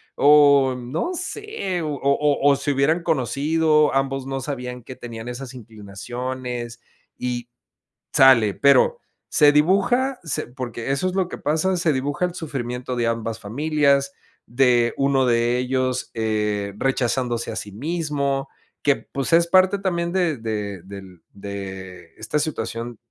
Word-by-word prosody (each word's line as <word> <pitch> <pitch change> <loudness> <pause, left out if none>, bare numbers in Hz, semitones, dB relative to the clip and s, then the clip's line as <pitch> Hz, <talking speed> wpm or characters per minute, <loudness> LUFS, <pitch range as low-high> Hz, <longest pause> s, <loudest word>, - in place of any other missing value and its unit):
o 140 -2 +5
no 125 - -3
sé, 360 - -4
o 155 - -2
o 140 +1 +2
o - - +4
se 140 +1 -2
hubieran 155 +5 +1
conocido, 155 +1 +2
ambos 135 0 -1
no 135 0 -4
sabían 125 -2 -5
que 130 - -9
tenían 115 -2 -8
esas 125 +1 -7
inclinaciones 120 +2 -6 0.4
y, 120 -1 -4 0.6
sale, 115 -6 +6
pero, 145 - +4 0.3
se 150 -2 +5
dibuja, 240 - +2
se 160 - -3
porque 120 -1 -6
eso 140 +7 0
es 185 - -1
lo 190 -2 0
que - - -7
pasa, 160 +6 0
se 165 -2 +1
dibuja 145 +5 -1
el 180 -1 -2
sufrimiento 125 -6 -4
de 120 -1 0
ambas 115 -1 -2
familias, 140 +4 +1 0.3
de 120 -1 +3
uno 135 -1 +2
de 120 0 +2
ellos, 130 0 -1
eh, 105 -2 -1
rechazándose 125 -2 -1
a - - -7
sí 105 - -5
mismo, 140 - -2 0.3
que 140 -1 +3
pues, 140 +3 -5
es 170 +1 +5
parte 185 +3 +4
también 170 -3 -1
de 175 -7 0
de 105 -4 -4
del 95 -2 -11
de 95 -3 -8
esta 110 +7 -2
situación 120 -5 -4
135 Hz, 145 wpm, -22 LUFS, 120-150 Hz, 0.6 s, sale